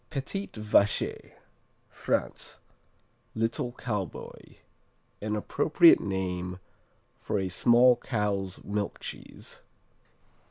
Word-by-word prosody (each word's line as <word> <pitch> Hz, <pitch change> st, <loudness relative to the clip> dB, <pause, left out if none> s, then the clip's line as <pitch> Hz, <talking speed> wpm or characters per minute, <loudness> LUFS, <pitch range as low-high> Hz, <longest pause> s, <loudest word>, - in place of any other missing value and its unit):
Petit 160 Hz, +7 st, -4 dB
Vacher 105 Hz, -1 st, +1 dB, 0.5 s
France -, -, -3 dB, 0.8 s
"Little 115 Hz, +2 st, -1 dB
Cowboy," 105 Hz, -8 st, -6 dB, 0.7 s
an 105 Hz, 0 st, -2 dB
appropriate 150 Hz, +9 st, +5 dB
name 90 Hz, -2 st, -3 dB, 0.6 s
for -, -, -2 dB
a 95 Hz, -1 st, -1 dB
small 120 Hz, +5 st, +5 dB
cow's 100 Hz, -6 st, -2 dB
milk 100 Hz, 0 st, -3 dB
cheese. -, -, -9 dB
105 Hz, 80 wpm, -28 LUFS, 95-120 Hz, 0.8 s, appropriate